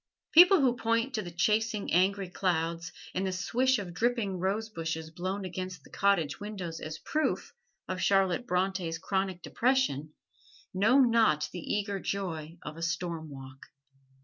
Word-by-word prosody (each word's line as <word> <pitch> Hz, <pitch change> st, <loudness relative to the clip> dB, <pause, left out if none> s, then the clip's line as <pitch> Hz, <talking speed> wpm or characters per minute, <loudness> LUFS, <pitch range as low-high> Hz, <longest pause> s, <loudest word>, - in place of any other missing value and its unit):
People 355 Hz, +1 st, +8 dB
who 250 Hz, -3 st, +3 dB
point 230 Hz, +3 st, 0 dB
to 220 Hz, -, -1 dB
the 175 Hz, -, -7 dB
chasing, 210 Hz, +5 st, 0 dB
angry 190 Hz, +2 st, +2 dB
clouds 170 Hz, -2 st, -1 dB, 0.2 s
and 190 Hz, +1 st, -1 dB
the -, -, -1 dB
swish 245 Hz, +8 st, +1 dB
of 185 Hz, -5 st, -6 dB
dripping 225 Hz, -3 st, 0 dB
rosebushes 175 Hz, -5 st, -2 dB
blown 185 Hz, +4 st, -3 dB
against 185 Hz, 0 st, -6 dB
the -, -, -18 dB
cottage 185 Hz, -7 st, +1 dB
windows 190 Hz, -6 st, -5 dB
as 155 Hz, 0 st, -6 dB
proof 305 Hz, -, -1 dB, 0.3 s
of 185 Hz, 0 st, -3 dB
Charlotte 195 Hz, +3 st, +2 dB
Bronte's 180 Hz, -3 st, 0 dB
chronic 190 Hz, 0 st, -2 dB
depression 230 Hz, -, 0 dB, 0.6 s
know 210 Hz, +8 st, +4 dB
not 225 Hz, -, +3 dB
the 180 Hz, -, -5 dB
eager 200 Hz, +3 st, -2 dB
joy 170 Hz, -5 st, -4 dB
of 150 Hz, +2 st, -7 dB
a -, -, -8 dB
storm 170 Hz, -1 st, -3 dB
walk. 135 Hz, -1 st, -11 dB
190 Hz, 150 wpm, -30 LUFS, 165-215 Hz, 0.6 s, People